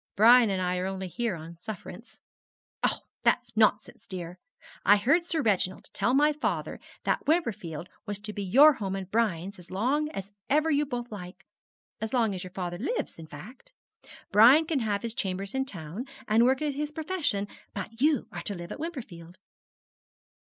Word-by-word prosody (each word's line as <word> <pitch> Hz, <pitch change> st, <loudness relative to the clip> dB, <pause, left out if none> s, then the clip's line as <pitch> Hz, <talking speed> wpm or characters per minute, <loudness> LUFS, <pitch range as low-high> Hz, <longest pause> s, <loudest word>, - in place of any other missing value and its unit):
Brian 235 Hz, +2 st, +7 dB
and 190 Hz, -2 st, 0 dB
I 180 Hz, 0 st, 0 dB
are 185 Hz, -, -1 dB
only 190 Hz, 0 st, -4 dB
here 230 Hz, +2 st, -2 dB
on 165 Hz, +1 st, -10 dB
sufferance.' 215 Hz, +3 st, -9 dB, 0.7 s
'Oh, -, -, +1 dB, 0.2 s
that's 240 Hz, -2 st, +1 dB
nonsense, 215 Hz, -1 st, +2 dB
dear. 180 Hz, -2 st, -7 dB, 0.4 s
I 205 Hz, +1 st, +7 dB
heard 280 Hz, +12 st, +3 dB
Sir 325 Hz, -3 st, -1 dB
Reginald 190 Hz, -4 st, 0 dB
tell 245 Hz, -, +1 dB
my 295 Hz, +2 st, +4 dB
father 300 Hz, -, -2 dB, 0.2 s
that -, -, 0 dB
Wimperfield 195 Hz, -, -1 dB, 0.2 s
was 205 Hz, -1 st, -1 dB
to 210 Hz, 0 st, -5 dB
be 205 Hz, -, -4 dB
your 275 Hz, +11 st, +7 dB
home 195 Hz, -6 st, -3 dB
and 190 Hz, -1 st, -6 dB
Brian's 200 Hz, -4 st, 0 dB
as 175 Hz, -, -13 dB
long 265 Hz, +11 st, 0 dB
as 195 Hz, -7 st, -7 dB, 0.2 s
ever 310 Hz, +3 st, +3 dB
you 295 Hz, 0 st, +2 dB
both 245 Hz, -3 st, -4 dB
like 185 Hz, -2 st, -9 dB, 0.5 s
as 220 Hz, +3 st, -2 dB
long 225 Hz, -4 st, +2 dB
as 185 Hz, -, -5 dB
your 185 Hz, -, -7 dB
father 175 Hz, -1 st, -5 dB
lives, 325 Hz, -, -3 dB
in 160 Hz, -, -9 dB
fact. 235 Hz, -, -12 dB, 0.6 s
Brian 250 Hz, +10 st, +7 dB
can 315 Hz, -3 st, 0 dB
have 210 Hz, -3 st, -1 dB
his 230 Hz, -1 st, -3 dB
chambers 195 Hz, -1 st, -3 dB
in 265 Hz, 0 st, 0 dB
town, 185 Hz, -, -6 dB, 0.2 s
and 225 Hz, +2 st, +5 dB
work 265 Hz, +4 st, +2 dB
at 295 Hz, -2 st, 0 dB
his 295 Hz, +2 st, -3 dB
profession, 305 Hz, -, -1 dB, 0.3 s
but 220 Hz, +4 st, -6 dB
you 295 Hz, -4 st, +3 dB
are -, -, -5 dB
to 205 Hz, -, -3 dB
live 175 Hz, -1 st, -8 dB
at -, -, -6 dB
Wimperfield.' 195 Hz, -, -7 dB
215 Hz, 180 wpm, -28 LUFS, 185-270 Hz, 0.7 s, Brian